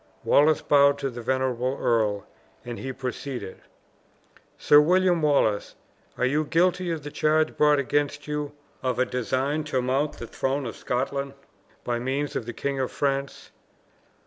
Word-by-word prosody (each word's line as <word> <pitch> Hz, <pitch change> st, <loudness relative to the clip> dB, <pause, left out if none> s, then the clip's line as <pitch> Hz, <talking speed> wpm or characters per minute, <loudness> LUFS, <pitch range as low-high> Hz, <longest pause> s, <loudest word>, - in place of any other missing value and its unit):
Wallace 150 Hz, +2 st, +4 dB
bowed 140 Hz, 0 st, +5 dB
to 140 Hz, -1 st, -3 dB
the 120 Hz, 0 st, -7 dB
venerable 130 Hz, +1 st, -1 dB
earl, 105 Hz, -4 st, +1 dB, 0.4 s
and 120 Hz, -1 st, -6 dB
he 135 Hz, -, -4 dB
proceeded: 130 Hz, -3 st, -6 dB, 1.0 s
"Sir 145 Hz, -, +6 dB
William 180 Hz, +1 st, +3 dB
Wallace, 140 Hz, -9 st, +1 dB, 0.4 s
are 125 Hz, -, +1 dB
you 145 Hz, +4 st, +1 dB
guilty 180 Hz, +3 st, +1 dB
of 160 Hz, -3 st, -3 dB
the 145 Hz, -, -7 dB
charge 155 Hz, +1 st, +1 dB
brought 150 Hz, -1 st, +4 dB
against 145 Hz, +1 st, -1 dB
you, 150 Hz, -1 st, -3 dB, 0.3 s
of 130 Hz, -2 st, -1 dB
a 130 Hz, -, +2 dB
design 130 Hz, +6 st, -1 dB
to 145 Hz, -4 st, -1 dB
mount 135 Hz, +4 st, 0 dB
the 120 Hz, -, -8 dB
throne 135 Hz, +4 st, -2 dB
of 115 Hz, -, -5 dB
Scotland 140 Hz, +2 st, -3 dB, 0.5 s
by 120 Hz, -1 st, -1 dB
means 135 Hz, +4 st, -2 dB
of 115 Hz, -, -3 dB
the -, -, -3 dB
King 140 Hz, +2 st, -3 dB
of 130 Hz, -, -1 dB
France?" 140 Hz, -1 st, -2 dB
140 Hz, 155 wpm, -25 LUFS, 125-150 Hz, 1.0 s, Sir